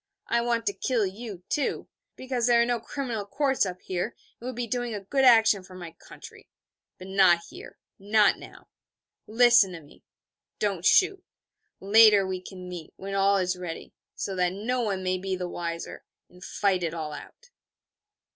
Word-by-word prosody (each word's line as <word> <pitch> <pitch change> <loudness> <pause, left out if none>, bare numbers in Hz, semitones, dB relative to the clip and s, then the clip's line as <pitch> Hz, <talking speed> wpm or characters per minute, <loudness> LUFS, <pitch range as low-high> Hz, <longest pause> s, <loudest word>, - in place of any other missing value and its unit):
I 235 - +1
want 235 -1 -1
to 200 - 0
kill 235 -2 0
you, 195 -1 -7
too, 290 - -2 0.3
because 255 -2 -2
there 240 -1 +5
are 235 - +4
no 240 -1 -1
criminal 235 -2 -4
courts 265 +1 0
up 180 0 -7
here, 180 -2 -2
and 235 - -9 0.3
it - - -10
would 255 -1 -5
be 245 0 -3
doing 240 -1 -3
a - - -4
good 270 +6 0
action 225 -5 +6
for 185 0 -14
my 175 -2 -8
country. 165 - -15 0.5
But 185 - -11
not 190 -3 +4
here - - -12 0.2
not 205 +1 +3
now. - - -14 0.6
Listen 230 -4 +5
to 170 - -7
me 145 -2 -19 0.6
don't 195 -4 -2
shoot. 380 0 +3 0.6
Later 210 0 +6
we 185 -1 -4
can 185 -1 -10
meet, 175 -3 -9
when 195 +1 -7
all 195 0 +3
is 185 -1 0
ready, 180 -2 -8 0.2
so 195 - -4
that 180 0 +1
no 240 +6 -2
one 195 -5 -2
may 185 0 -1
be 190 0 -3
the 180 -1 -4
wiser, 170 -1 -6 0.3
and 180 +1 -16
fight 190 -2 0
it 170 -1 -3
all 155 -2 -5
out.' 480 - -12
200 Hz, 185 wpm, -26 LUFS, 185-235 Hz, 0.6 s, action